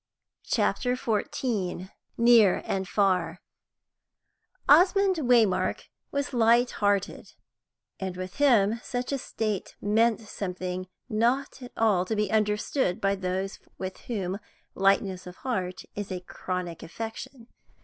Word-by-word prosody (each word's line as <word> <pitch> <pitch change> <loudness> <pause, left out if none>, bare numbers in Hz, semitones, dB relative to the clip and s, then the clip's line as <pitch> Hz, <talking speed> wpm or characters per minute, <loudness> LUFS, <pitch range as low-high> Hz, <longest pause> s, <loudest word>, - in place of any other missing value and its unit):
CHAPTER 250 -1 +1
XIV 210 -5 -2 0.3
NEAR 230 -5 +5
AND 190 -1 -2
FAR 180 -4 +1 1.3
Osmond 375 +4 +5
Waymark 240 -9 +2 0.2
was 280 0 -2
light 235 +1 +4
hearted; 205 -1 -1 0.7
and 190 -2 -4
with 185 0 -6
him 230 -6 +4
such 250 +1 -3
a 275 - -1
state 215 -5 -3
meant 220 +2 +2
something 185 -3 -5 0.2
not 245 +4 0
at 245 - -9
all 210 -5 +3
to 220 - -2
be 210 -2 0
understood 210 -1 +1
by 195 0 +2
those 190 0 -3 0.2
with 185 0 -5
whom 195 -4 -2 0.3
lightness 195 -1 +1
of 180 - -9
heart 190 -8 -3
is 205 -1 -5
a 180 -1 -4
chronic 180 -2 -5
affection. 225 +5 -7
210 Hz, 120 wpm, -27 LUFS, 185-240 Hz, 1.3 s, NEAR